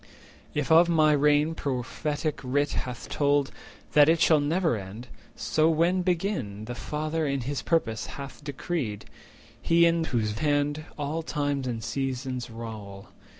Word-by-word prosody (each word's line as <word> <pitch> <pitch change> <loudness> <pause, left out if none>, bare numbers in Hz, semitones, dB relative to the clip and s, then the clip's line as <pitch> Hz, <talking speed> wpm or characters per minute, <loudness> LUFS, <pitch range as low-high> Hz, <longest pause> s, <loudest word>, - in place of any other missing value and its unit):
If 150 +1 -1
of 170 +2 +7
my 155 -2 +4
reign 150 +2 +3
Prophetic 145 +3 -2
Writ 145 +3 +1
hath 125 -2 -4
told 145 -1 +1 0.4
That 150 0 +7
it 165 0 +4
shall 155 -1 +5
never 160 0 +1
end, 105 +4 -8 0.3
so, 155 +1 +2
when 170 +3 +2
begin 170 - -1
The 120 - -5
Father 155 +4 -2
in 140 -1 -1
his 135 +3 -3
purpose 120 -10 0
hath 140 +1 -8
decreed— 140 - -3 0.6
He 170 0 +4
in 165 -1 +2
whose 110 -6 -1
hand 145 +1 0
all 150 +2 -2
times 145 -4 -2
and 115 -3 -3
seasons 130 0 -3
rowl. 110 -4 -8
145 Hz, 145 wpm, -27 LUFS, 125-160 Hz, 0.6 s, of